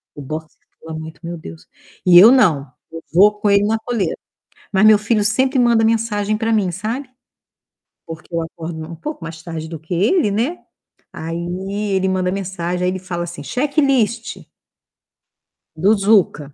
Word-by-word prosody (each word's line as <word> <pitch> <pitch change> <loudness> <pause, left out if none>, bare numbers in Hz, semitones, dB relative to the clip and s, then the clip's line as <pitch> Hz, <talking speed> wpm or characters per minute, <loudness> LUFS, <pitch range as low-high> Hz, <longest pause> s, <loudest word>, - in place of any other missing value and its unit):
o 145 - -8
boxer 155 +3 -7 0.2
pula 160 0 -8
muito, 160 0 -9
meu 170 +1 -5
Deus. 80 - -11 0.4
E 175 -1 +7
eu 215 +6 +9
não, 155 - +3 0.2
eu 165 0 -8
vou 210 +4 +5
com 205 - +1
ele 200 0 +4
na 220 +2 +1
coleira. 220 -7 -2 0.6
Mas 195 +1 +3
meu 215 -1 +7
filho 210 0 0
sempre 260 +6 +1
manda 235 -2 +4
mensagem 215 -2 0
para 225 +1 -1
mim, 205 -5 +1
sabe? 225 - -4 1.0
Porque 165 +1 -10
eu 170 - 0
acordo 165 0 -7
um 170 - -7
pouco 295 - -7
mais 165 -1 -8
tarde 165 -2 -6
do 160 -1 -7
que 160 +4 -7
ele, 210 - +2
né. 240 - -1 0.5
Aí 165 +1 -5 0.6
ele 190 0 +1
manda 185 -1 0
mensagem, 180 -2 -3
aí 180 - +1
ele 185 - -4
fala 175 -2 -4
assim: 175 -3 -7
"Checklist" 255 - 0 1.3
"do 190 +7 +3
Zuca". 195 -8 +2
190 Hz, 165 wpm, -19 LUFS, 165-220 Hz, 1.3 s, eu